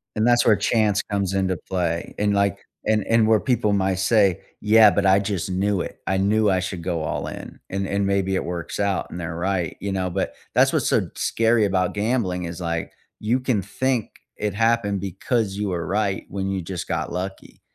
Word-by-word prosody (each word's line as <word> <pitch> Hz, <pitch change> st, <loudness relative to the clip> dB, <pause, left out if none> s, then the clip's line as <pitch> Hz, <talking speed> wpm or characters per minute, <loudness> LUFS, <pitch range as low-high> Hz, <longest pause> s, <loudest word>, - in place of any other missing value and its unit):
And 110 Hz, +1 st, +2 dB
that's 120 Hz, 0 st, +4 dB
where 110 Hz, -, +6 dB
chance 105 Hz, 0 st, +2 dB
comes 100 Hz, -2 st, -2 dB
into 95 Hz, -1 st, +1 dB
play 85 Hz, -1 st, -3 dB
and, 105 Hz, 0 st, +1 dB
like 100 Hz, -2 st, +1 dB, 0.3 s
and 110 Hz, -1 st, +1 dB
and 115 Hz, -1 st, +4 dB
where 110 Hz, -1 st, +5 dB
people 120 Hz, -4 st, +1 dB
might 95 Hz, -1 st, +1 dB
say, 95 Hz, -1 st, +3 dB, 0.2 s
"Yeah, 110 Hz, 0 st, +7 dB
but 100 Hz, 0 st, 0 dB
I 95 Hz, +1 st, +5 dB
just 100 Hz, -3 st, -2 dB
knew 100 Hz, +1 st, +1 dB
it. -, -, -7 dB
I 95 Hz, -, +1 dB
knew 105 Hz, +2 st, +3 dB
I 95 Hz, -1 st, +2 dB
should 90 Hz, -1 st, -4 dB
go 85 Hz, -2 st, -2 dB
all 75 Hz, -, -3 dB
in." -, -, -8 dB
And 95 Hz, 0 st, -2 dB
and 100 Hz, 0 st, 0 dB
maybe 95 Hz, -1 st, +1 dB
it -, -, 0 dB
works 85 Hz, 0 st, -4 dB
out 100 Hz, -2 st, 0 dB
and -, -, -7 dB
they're 80 Hz, -1 st, -4 dB
right, 90 Hz, -1 st, -1 dB
you 100 Hz, -, -3 dB
know? 95 Hz, -1 st, -1 dB
But 95 Hz, +2 st, -2 dB, 0.2 s
that's -, -, +4 dB
what's -, -, +1 dB
so -, -, +1 dB
scary 115 Hz, 0 st, +2 dB
about 95 Hz, -2 st, 0 dB
gambling 105 Hz, -4 st, -1 dB
is 85 Hz, +1 st, -6 dB
like, 85 Hz, -1 st, -2 dB, 0.3 s
you 115 Hz, +4 st, +1 dB
can 125 Hz, -5 st, 0 dB
think 120 Hz, +4 st, -2 dB, 0.2 s
it 105 Hz, -2 st, -2 dB
happened 115 Hz, -2 st, +1 dB
because 100 Hz, +2 st, -1 dB
you 105 Hz, -1 st, -2 dB
were 85 Hz, -2 st, -2 dB
right 100 Hz, 0 st, -1 dB
when 95 Hz, -1 st, -3 dB
you 95 Hz, -1 st, -2 dB
just 85 Hz, 0 st, -5 dB
got -, -, -2 dB
lucky. 95 Hz, +2 st, -6 dB
100 Hz, 210 wpm, -23 LUFS, 95-105 Hz, 0.3 s, Yeah